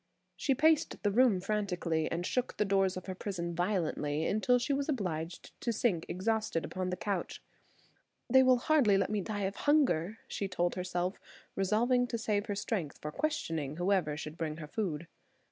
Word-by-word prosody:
She 270 Hz, -, +1 dB
paced 310 Hz, -1 st, +2 dB
the 205 Hz, -, +2 dB
room 230 Hz, -3 st, +4 dB
frantically, 180 Hz, -5 st, -1 dB
and 170 Hz, +1 st, -2 dB
shook 250 Hz, +4 st, -1 dB
the 210 Hz, -, +2 dB
doors 195 Hz, -1 st, +2 dB
of 185 Hz, -, -7 dB
her 190 Hz, -, -4 dB
prison 180 Hz, -3 st, -4 dB
violently 165 Hz, -4 st, 0 dB
until 230 Hz, +4 st, +3 dB
she 245 Hz, +3 st, 0 dB
was 280 Hz, +2 st, -1 dB
obliged 175 Hz, -, -3 dB
to 235 Hz, -, 0 dB
sink 205 Hz, -7 st, 0 dB
exhausted 215 Hz, -3 st, -1 dB
upon 185 Hz, 0 st, -3 dB
the 180 Hz, -, -2 dB
couch. 195 Hz, -2 st, -3 dB, 0.8 s
"They 260 Hz, +2 st, +6 dB
will 255 Hz, -1 st, +5 dB
hardly 245 Hz, -7 st, +4 dB
let 195 Hz, +1 st, 0 dB
me 210 Hz, -1 st, 0 dB
die 205 Hz, +1 st, -3 dB
of 195 Hz, +1 st, -2 dB
hunger," 255 Hz, -, +2 dB
she 200 Hz, -, -3 dB
told 175 Hz, -2 st, 0 dB
herself, 180 Hz, 0 st, -2 dB, 0.4 s
resolving 240 Hz, +6 st, +2 dB
to 235 Hz, -, -2 dB
save 210 Hz, -1 st, -1 dB
her 205 Hz, -, -2 dB
strength 200 Hz, -6 st, -3 dB
for 150 Hz, -, -5 dB
questioning 160 Hz, -, -2 dB
whoever 175 Hz, -5 st, +1 dB
should 155 Hz, +1 st, -7 dB
bring 155 Hz, -2 st, -2 dB
her 160 Hz, -, -6 dB
food. 170 Hz, -4 st, -3 dB
195 Hz, 180 wpm, -32 LUFS, 175-225 Hz, 0.8 s, They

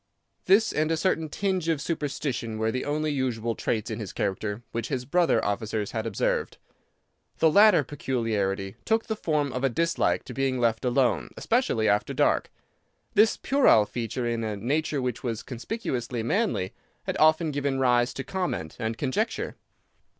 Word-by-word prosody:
This 205 Hz, +5 st, +4 dB
and 155 Hz, +1 st, +1 dB
a 165 Hz, -, +1 dB
certain 160 Hz, -2 st, 0 dB
tinge 185 Hz, -1 st, -1 dB
of 160 Hz, -3 st, +1 dB
superstition 140 Hz, -7 st, -3 dB
were 110 Hz, 0 st, 0 dB
the 130 Hz, -, -3 dB
only 150 Hz, +1 st, 0 dB
unusual 120 Hz, -4 st, -1 dB
traits 110 Hz, -1 st, -2 dB
in -, -, -4 dB
his -, -, -6 dB
character 105 Hz, +3 st, -2 dB
which 115 Hz, 0 st, -3 dB
his 130 Hz, -3 st, -3 dB
brother 175 Hz, +5 st, +2 dB
officers 105 Hz, 0 st, -2 dB
had 110 Hz, -1 st, -3 dB
observed. 105 Hz, -, -1 dB, 0.8 s
The 160 Hz, -, +4 dB
latter 205 Hz, -4 st, +6 dB
peculiarity 110 Hz, -8 st, -2 dB
took 225 Hz, 0 st, +1 dB
the 220 Hz, -, -2 dB
form 150 Hz, -8 st, -1 dB
of 125 Hz, -, -3 dB
a 135 Hz, -, +3 dB
dislike 165 Hz, +6 st, +1 dB
to 125 Hz, -, -9 dB
being 135 Hz, 0 st, 0 dB
left 115 Hz, -2 st, +1 dB
alone, 125 Hz, -1 st, +1 dB
especially 230 Hz, -, +1 dB
after 105 Hz, 0 st, +1 dB
dark. -, -, +2 dB, 0.6 s
This 215 Hz, +1 st, +4 dB
puerile 265 Hz, -, +4 dB
feature 120 Hz, +2 st, -3 dB
in 115 Hz, -1 st, -1 dB
a 105 Hz, -2 st, -3 dB
nature 140 Hz, +5 st, -1 dB
which 125 Hz, -2 st, -2 dB
was 115 Hz, -3 st, -3 dB
conspicuously 125 Hz, -, -4 dB
manly 185 Hz, -, 0 dB, 0.3 s
had -, -, -3 dB
often 155 Hz, +1 st, +4 dB
given 140 Hz, -1 st, -1 dB
rise 125 Hz, -2 st, +3 dB
to 135 Hz, -, -4 dB
comment 180 Hz, -, -3 dB
and 110 Hz, -1 st, -2 dB
conjecture. 150 Hz, -, -1 dB
130 Hz, 165 wpm, -26 LUFS, 115-160 Hz, 0.8 s, latter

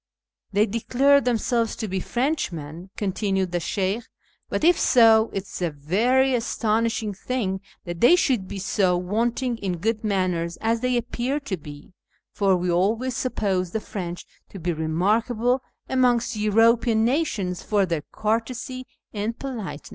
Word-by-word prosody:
" -, -, -55 dB
They 205 Hz, +2 st, +4 dB
declare 260 Hz, +6 st, +3 dB
themselves 235 Hz, -2 st, 0 dB
to 220 Hz, -, -4 dB
be 190 Hz, -1 st, -2 dB
Preuchmen," 180 Hz, -, -3 dB
continued 195 Hz, -2 st, -1 dB
the 175 Hz, -, 0 dB
Sheykh, 195 Hz, +5 st, -1 dB, 0.3 s
" -, -, -40 dB
but -, -, -2 dB
if 345 Hz, +1 st, +5 dB
so 225 Hz, -3 st, +5 dB
it 195 Hz, -, -3 dB
is 190 Hz, -, -9 dB
a 175 Hz, -, +1 dB
very 225 Hz, -, +2 dB
astonishing 225 Hz, -2 st, 0 dB
thing 195 Hz, -2 st, -2 dB, 0.2 s
that 175 Hz, -1 st, -6 dB
they 245 Hz, +9 st, +7 dB
should 250 Hz, -, +1 dB
be 200 Hz, -, -6 dB
so 185 Hz, -1 st, +1 dB
wanting 230 Hz, +6 st, -1 dB
in 185 Hz, -3 st, -2 dB
good 220 Hz, +5 st, -1 dB
manners 180 Hz, -5 st, -1 dB
as 225 Hz, +1 st, +1 dB
they 250 Hz, +1 st, +1 dB
appear 245 Hz, +4 st, -2 dB
to 245 Hz, -9 st, -3 dB
be, 145 Hz, 0 st, -12 dB, 0.4 s
for 195 Hz, -2 st, +2 dB
we 180 Hz, 0 st, -1 dB
always 220 Hz, +8 st, +1 dB
suppose 195 Hz, -8 st, -1 dB
the 220 Hz, -, -2 dB
Prench 180 Hz, -5 st, -6 dB, 0.2 s
to -, -, -10 dB
be 175 Hz, -1 st, -2 dB
remarkable 215 Hz, +10 st, +1 dB, 0.3 s
amongst 250 Hz, -3 st, +2 dB
European 225 Hz, +2 st, +3 dB
nations 225 Hz, -, -1 dB
for 205 Hz, -2 st, +1 dB
their 165 Hz, -4 st, -2 dB
courtesy 235 Hz, +4 st, -2 dB, 0.3 s
and 215 Hz, +2 st, -3 dB
politeness." 215 Hz, -, -6 dB
215 Hz, 155 wpm, -24 LUFS, 185-240 Hz, 0.4 s, they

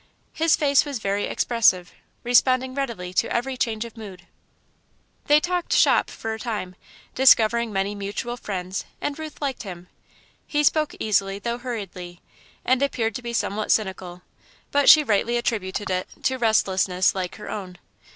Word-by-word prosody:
His 325 Hz, 0 st, +3 dB
face 280 Hz, -2 st, +3 dB
was 285 Hz, -3 st, -4 dB
very 200 Hz, -1 st, -1 dB
expressive, 190 Hz, -7 st, +1 dB, 0.3 s
responding 255 Hz, +1 st, +3 dB
readily 235 Hz, -10 st, -4 dB
to -, -, 0 dB
every 260 Hz, +2 st, -1 dB
change 225 Hz, -2 st, -2 dB
of 235 Hz, -, -11 dB
mood. 195 Hz, -6 st, -10 dB, 1.0 s
They 295 Hz, +1 st, +6 dB
talked 350 Hz, +2 st, -2 dB
"shop" -, -, +4 dB
for 225 Hz, 0 st, -5 dB
a 220 Hz, -, -6 dB
time, 210 Hz, -6 st, -4 dB, 0.4 s
discovering 235 Hz, -3 st, +4 dB
many 195 Hz, +1 st, -1 dB
mutual 205 Hz, +4 st, -4 dB
friends, 190 Hz, -5 st, -5 dB, 0.2 s
and 290 Hz, +1 st, -4 dB
Ruth 310 Hz, -1 st, -8 dB
liked 270 Hz, -3 st, -2 dB
him. 180 Hz, -4 st, -9 dB, 0.6 s
He 295 Hz, 0 st, 0 dB
spoke 305 Hz, +1 st, +2 dB
easily, 195 Hz, -2 st, 0 dB
though 235 Hz, +4 st, -4 dB
hurriedly, 190 Hz, -8 st, -7 dB, 0.5 s
and 255 Hz, +1 st, +2 dB
appeared 235 Hz, -5 st, 0 dB
to 250 Hz, -, -5 dB
be 240 Hz, -1 st, -5 dB
somewhat 215 Hz, -2 st, -1 dB
cynical, 185 Hz, -4 st, -2 dB, 0.5 s
but 285 Hz, 0 st, +4 dB
she 310 Hz, -, +9 dB
rightly 230 Hz, 0 st, +1 dB
attributed 205 Hz, -4 st, -2 dB
it 185 Hz, 0 st, -1 dB, 0.2 s
to 260 Hz, -, +1 dB
restlessness 190 Hz, -5 st, +2 dB
like 185 Hz, -2 st, -4 dB
her 210 Hz, -, -8 dB
own. 185 Hz, -3 st, -6 dB
220 Hz, 155 wpm, -23 LUFS, 195-255 Hz, 1.0 s, she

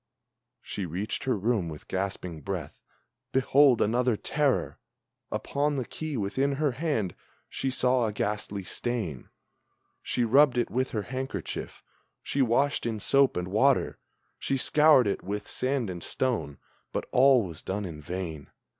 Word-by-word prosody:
She 95 Hz, -3 st, -4 dB
reached 95 Hz, +10 st, -3 dB
her 130 Hz, -4 st, +1 dB
room 100 Hz, -4 st, 0 dB
with 75 Hz, -2 st, -9 dB
gasping 95 Hz, -4 st, -3 dB
breath, -, -, -5 dB, 0.5 s
behold, 135 Hz, -1 st, +5 dB
another 120 Hz, +1 st, +1 dB
terror! 145 Hz, +1 st, 0 dB, 0.5 s
Upon 145 Hz, +1 st, -1 dB
the 130 Hz, -3 st, -2 dB
key 155 Hz, +1 st, -5 dB
within 130 Hz, +7 st, 0 dB
her 145 Hz, 0 st, +1 dB
hand; 125 Hz, -, -1 dB, 0.3 s
she 135 Hz, -, -2 dB
saw 125 Hz, -2 st, +2 dB
a -, -, -2 dB
ghastly 105 Hz, -1 st, -3 dB
stain; 95 Hz, -, -3 dB, 0.7 s
She 125 Hz, -, -1 dB
rubbed 130 Hz, +3 st, +5 dB
it 120 Hz, -, 0 dB
with 130 Hz, +2 st, 0 dB
her 105 Hz, -3 st, -2 dB
handkerchief, 130 Hz, -7 st, -5 dB, 0.4 s
she 140 Hz, -, -1 dB
washed 130 Hz, +2 st, +2 dB
in 110 Hz, -2 st, -2 dB
soap 135 Hz, +3 st, +3 dB
and 90 Hz, +1 st, -3 dB
water, 130 Hz, +7 st, +2 dB, 0.4 s
She 135 Hz, -, 0 dB
scoured 150 Hz, -1 st, +5 dB
it 100 Hz, -, -1 dB
with 105 Hz, +2 st, -4 dB
sand 130 Hz, -2 st, -1 dB
and 90 Hz, -2 st, -6 dB
stone, 115 Hz, -, -2 dB, 0.3 s
but -, -, -2 dB
all 130 Hz, -2 st, +6 dB
was 85 Hz, -5 st, -7 dB
done 100 Hz, +2 st, -3 dB
in 80 Hz, -4 st, -7 dB
vain! 80 Hz, -3 st, -5 dB
120 Hz, 145 wpm, -28 LUFS, 100-135 Hz, 0.7 s, all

